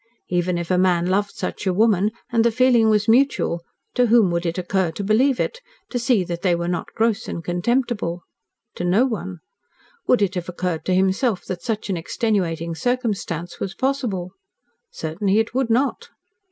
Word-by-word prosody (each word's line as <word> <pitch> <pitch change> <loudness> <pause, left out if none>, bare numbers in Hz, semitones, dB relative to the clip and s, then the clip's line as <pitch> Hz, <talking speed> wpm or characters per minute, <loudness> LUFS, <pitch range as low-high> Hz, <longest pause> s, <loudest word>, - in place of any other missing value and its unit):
Even 175 0 0
if 170 +1 -3
a 180 - +3
man 180 -2 +3
loved 200 +3 0
such - - -4
a 185 - +2
woman, 210 -1 +3 0.2
and 230 -1 +3
the 235 - +4
feeling 240 -2 +4
was 210 -1 +2
mutual, 230 -8 +2 0.3
to 250 -1 +3
whom 225 -5 +5
would 170 0 -1
it 170 - -2
occur 185 0 0
to 165 +5 -5
believe 240 +6 +3
it 480 - -2 0.3
to 245 - -1
see 235 -5 +2
that 170 -1 -5
they 180 -3 +2
were 170 0 -3
not 175 -1 -3
gross 225 -2 +1
and 170 - -5
contemptible? 180 -1 -1 0.5
To - - -3
no 190 +8 +3
one. 190 -8 -4 0.7
Would 245 -5 +4
it 195 -1 0
have 180 -2 -4
occurred 180 -2 -3
to 185 - +1
himself 190 +3 +1
that 180 -2 -5
such 215 +3 -3
an 185 - -1
extenuating 170 -3 -1
circumstance 200 -6 -2
was 190 0 -4
possible? 245 -10 -1 0.6
Certainly 190 +6 -1
it 225 +1 +1
would 260 -1 0
not. 255 +4 0
195 Hz, 180 wpm, -22 LUFS, 175-230 Hz, 0.7 s, whom